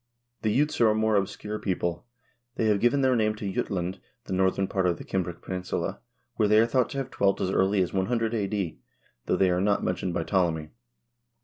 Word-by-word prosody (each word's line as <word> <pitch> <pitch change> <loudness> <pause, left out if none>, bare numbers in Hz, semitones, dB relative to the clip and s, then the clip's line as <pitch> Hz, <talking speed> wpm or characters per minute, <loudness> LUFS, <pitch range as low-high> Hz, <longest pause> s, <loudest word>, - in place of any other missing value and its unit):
The 110 - +1
Jutes 145 +6 +1
are 115 - +6
a 105 - +2
more 110 0 +2
obscure 105 +2 -2
people. 85 +1 -2 0.5
They 115 - 0
have 105 -2 +3
given 120 +5 +3
their 130 -1 +3
name 110 -2 +1
to 100 -3 -4
Jutland, 95 0 -2 0.2
the - - -5
northern 95 +1 +1
part 95 -1 0
of 85 - +1
the - - -8
Cimbric 90 -2 -3
peninsula, 90 -1 -3 0.4
where 105 - +3
they 105 +1 +5
are 115 - +5
thought 125 +1 +1
to 140 - -6
have 135 -1 -3
dwelt 100 -1 +1
as 95 - 0
early 95 0 +3
as 90 - -5
100 115 +4 0
a.d., 100 -5 -2 0.5
though - - +2
they 95 -2 +3
are 90 +1 +1
not 100 +1 +1
mentioned 90 -1 -2
by - - 0
Ptolemy. 85 -5 0
100 Hz, 210 wpm, -27 LUFS, 95-110 Hz, 0.5 s, are